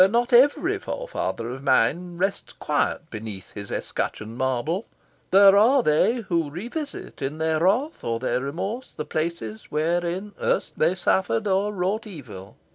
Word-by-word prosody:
Not 240 Hz, +3 st, +1 dB
every 290 Hz, +10 st, +5 dB
forefather 440 Hz, -, -4 dB
of 130 Hz, +1 st, -7 dB
mine 170 Hz, +8 st, +2 dB
rests 195 Hz, +3 st, -2 dB
quiet 150 Hz, +2 st, -1 dB
beneath 110 Hz, -3 st, -7 dB
his 100 Hz, -1 st, -7 dB
escutcheoned 110 Hz, +1 st, -3 dB
marble. 130 Hz, -, -1 dB, 0.4 s
There 195 Hz, +1 st, +7 dB
are 240 Hz, +6 st, +5 dB
they 230 Hz, +10 st, +3 dB
who 170 Hz, -7 st, -1 dB
revisit, 240 Hz, -, -6 dB
in 140 Hz, +3 st, -3 dB
their 160 Hz, 0 st, +1 dB
wrath 225 Hz, -, +1 dB
or 115 Hz, 0 st, -1 dB
their 125 Hz, 0 st, 0 dB
remorse, 195 Hz, -, -4 dB
the 150 Hz, -, -3 dB
places 155 Hz, -10 st, -3 dB
wherein 175 Hz, +5 st, -1 dB
erst 155 Hz, -, -1 dB
they 165 Hz, +4 st, +3 dB
suffered 190 Hz, +3 st, +1 dB
or 200 Hz, +1 st, +1 dB
wrought 200 Hz, +3 st, -1 dB
evil. 115 Hz, -, -10 dB
175 Hz, 145 wpm, -24 LUFS, 140-210 Hz, 0.4 s, There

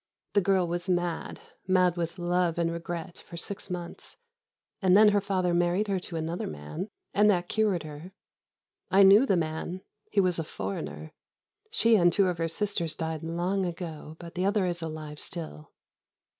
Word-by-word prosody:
The 205 Hz, -, +4 dB
girl 190 Hz, -1 st, +3 dB
was 175 Hz, +2 st, -3 dB
mad, 175 Hz, -2 st, -1 dB, 0.3 s
mad 185 Hz, -2 st, +3 dB
with 170 Hz, 0 st, -3 dB
love 175 Hz, -1 st, +1 dB
and 170 Hz, -1 st, +1 dB
regret 170 Hz, 0 st, -5 dB
for 170 Hz, -, -11 dB
six 200 Hz, +4 st, -4 dB
months; 175 Hz, -1 st, -6 dB, 0.6 s
and 190 Hz, 0 st, +5 dB
then 215 Hz, 0 st, +8 dB
her 205 Hz, -1 st, +2 dB
father 185 Hz, -3 st, 0 dB
married 175 Hz, +4 st, +2 dB
her 195 Hz, -2 st, +1 dB
to 175 Hz, -, -7 dB
another 165 Hz, +2 st, -3 dB
man, 75 Hz, -, -6 dB, 0.3 s
and 210 Hz, +1 st, +5 dB
that 175 Hz, -3 st, +2 dB
cured 210 Hz, -6 st, +1 dB
her. 155 Hz, +4 st, -9 dB, 0.8 s
I 195 Hz, +1 st, +6 dB
knew 205 Hz, +7 st, +7 dB
the 195 Hz, -, +3 dB
man: 165 Hz, +3 st, -3 dB, 0.3 s
he 205 Hz, -, +2 dB
was 180 Hz, -3 st, +2 dB
a -, -, 0 dB
foreigner. 80 Hz, -, -5 dB, 0.6 s
She 230 Hz, 0 st, +5 dB
and 175 Hz, -2 st, +5 dB
two 200 Hz, +3 st, +3 dB
of 180 Hz, -2 st, -1 dB
her 165 Hz, -, +1 dB
sisters 170 Hz, -2 st, -1 dB
died 160 Hz, -1 st, -3 dB
long 175 Hz, +4 st, -1 dB
ago, 165 Hz, -3 st, -5 dB
but 170 Hz, 0 st, -10 dB
the 180 Hz, -, -2 dB
other 200 Hz, 0 st, +2 dB
is 175 Hz, -1 st, -2 dB
alive 155 Hz, -2 st, -6 dB
still. 155 Hz, -, -6 dB
175 Hz, 175 wpm, -28 LUFS, 165-190 Hz, 0.8 s, then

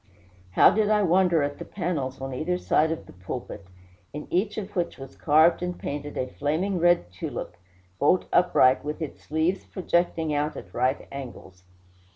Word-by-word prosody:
How -, -, +7 dB
did 210 Hz, -1 st, +1 dB
I 210 Hz, -1 st, +3 dB
wonder 175 Hz, -3 st, +3 dB
at 145 Hz, 0 st, -3 dB
the -, -, -5 dB
panels 150 Hz, -9 st, -3 dB
on 135 Hz, 0 st, -4 dB
either 175 Hz, +7 st, -1 dB
side 160 Hz, -3 st, +2 dB
of 165 Hz, -, -4 dB
the -, -, -14 dB
pulpit, 95 Hz, +1 st, -7 dB, 0.5 s
in 150 Hz, +1 st, -6 dB
each 200 Hz, +4 st, 0 dB
of 205 Hz, -1 st, -6 dB
which 175 Hz, -2 st, -1 dB
was 135 Hz, 0 st, -10 dB
carved 160 Hz, +3 st, +4 dB
and 180 Hz, 0 st, -3 dB
painted 145 Hz, 0 st, -5 dB
a 130 Hz, -, 0 dB
flaming 165 Hz, +9 st, -1 dB
red 175 Hz, -, +3 dB
tulip, 90 Hz, -1 st, -6 dB, 0.4 s
bolt 175 Hz, +6 st, +3 dB
upright, 135 Hz, -7 st, +4 dB
with 150 Hz, +1 st, -4 dB
its 155 Hz, -4 st, -7 dB
leaves 160 Hz, +5 st, 0 dB
projecting 170 Hz, -3 st, 0 dB
out 150 Hz, +1 st, -1 dB
at -, -, -10 dB
right 130 Hz, +3 st, 0 dB
angles! 105 Hz, -9 st, -9 dB
155 Hz, 175 wpm, -26 LUFS, 135-180 Hz, 0.5 s, How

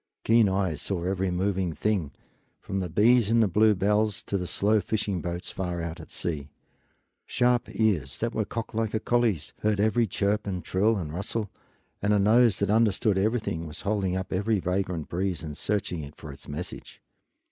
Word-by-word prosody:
Keen 115 Hz, -2 st, +5 dB
eyes 95 Hz, -6 st, 0 dB
saw 90 Hz, -4 st, -2 dB
every 95 Hz, +1 st, 0 dB
moving 90 Hz, -1 st, 0 dB
thing, 95 Hz, -6 st, -1 dB, 0.5 s
from 95 Hz, -, -4 dB
the 90 Hz, -2 st, -3 dB
bees 110 Hz, +5 st, +4 dB
in 115 Hz, +1 st, +4 dB
the 110 Hz, -, +4 dB
bluebells 105 Hz, +1 st, +2 dB
to -, -, -4 dB
the 90 Hz, -2 st, -1 dB
slow 105 Hz, +3 st, +2 dB
fishing 100 Hz, -5 st, -2 dB
boats 85 Hz, 0 st, -4 dB
far 90 Hz, -2 st, -3 dB
out 85 Hz, 0 st, -5 dB
at 80 Hz, -, -11 dB
sea; 75 Hz, -4 st, -4 dB, 0.8 s
sharp 125 Hz, 0 st, +2 dB
ears 90 Hz, -, 0 dB
that 115 Hz, +1 st, -2 dB
were 110 Hz, -, 0 dB
cocked 115 Hz, +3 st, -5 dB
like 110 Hz, -1 st, -1 dB
a -, -, +1 dB
collie's 115 Hz, -8 st, 0 dB
heard 105 Hz, -1 st, +1 dB
every 110 Hz, +2 st, +3 dB
chirp 105 Hz, +2 st, 0 dB
and 90 Hz, -4 st, -3 dB
trill 105 Hz, +6 st, +2 dB
and 80 Hz, -5 st, -5 dB
rustle, 100 Hz, +3 st, -3 dB, 0.5 s
and 105 Hz, +1 st, +2 dB
a 105 Hz, -, +3 dB
nose 110 Hz, +1 st, +5 dB
that 100 Hz, 0 st, 0 dB
understood 110 Hz, -1 st, +3 dB
everything 105 Hz, -6 st, -1 dB
was 75 Hz, +2 st, -6 dB
holding 100 Hz, -3 st, 0 dB
up 95 Hz, 0 st, -3 dB
every 105 Hz, +3 st, +1 dB
vagrant 90 Hz, -3 st, -2 dB
breeze 90 Hz, -1 st, -2 dB
and 75 Hz, -2 st, -6 dB
searching 95 Hz, -4 st, -2 dB
it 70 Hz, +1 st, -10 dB
for 75 Hz, -, -9 dB
its 70 Hz, -, -11 dB
message. 75 Hz, +5 st, -7 dB
100 Hz, 185 wpm, -27 LUFS, 90-110 Hz, 0.8 s, Keen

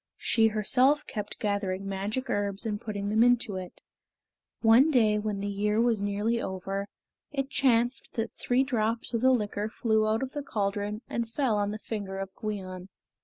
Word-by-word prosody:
She 225 Hz, -1 st, +3 dB
herself 250 Hz, +7 st, +3 dB
kept 210 Hz, -4 st, -5 dB
gathering 200 Hz, -2 st, -2 dB
magic 205 Hz, +7 st, -3 dB
herbs 205 Hz, -2 st, -1 dB
and 210 Hz, -2 st, -2 dB
putting 205 Hz, -2 st, -3 dB
them 220 Hz, +2 st, +3 dB
into 240 Hz, -4 st, +3 dB
it. 185 Hz, -1 st, -8 dB, 0.8 s
One 235 Hz, +6 st, +6 dB
day 220 Hz, -7 st, +3 dB
when 210 Hz, -2 st, -3 dB
the 200 Hz, -, -2 dB
year 210 Hz, +2 st, 0 dB
was 230 Hz, -3 st, +2 dB
nearly 205 Hz, +3 st, 0 dB
over, 195 Hz, +1 st, -3 dB, 0.4 s
it 275 Hz, -2 st, -3 dB
chanced 245 Hz, -1 st, +1 dB
that 225 Hz, -1 st, -2 dB
three 250 Hz, +2 st, +1 dB
drops 230 Hz, -3 st, -1 dB
of 230 Hz, -, 0 dB
the 260 Hz, -, +5 dB
liquor 210 Hz, -3 st, 0 dB
flew 220 Hz, -1 st, +1 dB
out 220 Hz, +3 st, +1 dB
of 265 Hz, -, -4 dB
the 290 Hz, -, -4 dB
caldron 205 Hz, -2 st, -2 dB
and 235 Hz, -1 st, -2 dB
fell 245 Hz, -2 st, +1 dB
on 205 Hz, 0 st, 0 dB
the 210 Hz, -, -4 dB
finger 205 Hz, -3 st, -5 dB
of 195 Hz, 0 st, -5 dB
Gwion. 185 Hz, -4 st, -5 dB
215 Hz, 175 wpm, -28 LUFS, 200-235 Hz, 0.8 s, One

